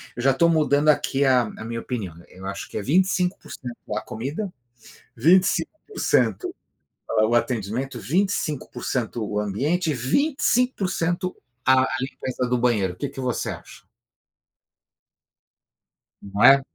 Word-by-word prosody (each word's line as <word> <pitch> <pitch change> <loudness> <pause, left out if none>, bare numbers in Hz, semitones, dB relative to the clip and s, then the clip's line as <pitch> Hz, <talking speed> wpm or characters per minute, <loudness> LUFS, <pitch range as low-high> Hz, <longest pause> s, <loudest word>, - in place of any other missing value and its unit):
eu 120 - -4
já 135 - +5
estou 170 +6 +3
mudando 150 -2 +3
aqui 140 -1 +2
a 130 -2 +5
a 110 - -7
minha 115 0 -4
opinião, 100 -10 -4
eu 95 +1 -12
acho 100 0 -5
que - - -5
é - - -1
25% 180 - 0 0.2
a - - -1
comida, 150 - -4 0.6
25% 190 - +2 0.5
a 110 -1 +3
o 120 - +2
atendimento, 120 +2 -1
25% 145 - -1
o 105 0 -2
ambiente 150 - 0
e - - 0
25% 190 - +1 0.3
a 130 0 +6
a - - +1
limpeza 130 -1 -3
do 125 - +2
banheiro. 110 -7 +1
O - - -18
que 140 - -2
que 135 - -7
você 125 -2 -1
acha? - - -11 2.4
Não 100 +2 -2
é? 135 +2 +9
135 Hz, 135 wpm, -24 LUFS, 115-175 Hz, 2.4 s, é